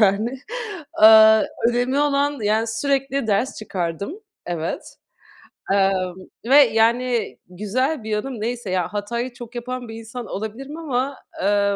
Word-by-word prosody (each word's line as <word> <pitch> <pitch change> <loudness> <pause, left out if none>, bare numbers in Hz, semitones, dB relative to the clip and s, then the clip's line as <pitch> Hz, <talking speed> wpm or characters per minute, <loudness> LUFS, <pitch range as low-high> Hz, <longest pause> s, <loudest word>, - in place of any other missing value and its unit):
yani. 215 +5 +2 0.6
Iıı, 220 0 +8 0.2
önemli 245 +3 0
olan, 285 0 +1
yani 215 +2 +1
sürekli 275 +3 -1
ders 215 +5 0
çıkardım. 200 - -4 0.3
Evet 170 -2 -4 0.8
Emm, 190 -2 +1 0.3
ve 260 +4 +4
yani, 235 -1 +3
güzel 230 - -1
bir 220 - -6
yanım 215 +2 -3
neyse 235 -1 -3
ya, 185 +1 -1
hatayı 235 +4 -3
çok 240 0 -11
yapan 245 0 -5
bir 225 - -8
insan 230 +1 -8
olabilirim 235 +9 -6
ama 275 -3 -2 0.3
eee, 200 0 +2
230 Hz, 130 wpm, -22 LUFS, 205-255 Hz, 0.8 s, Iıı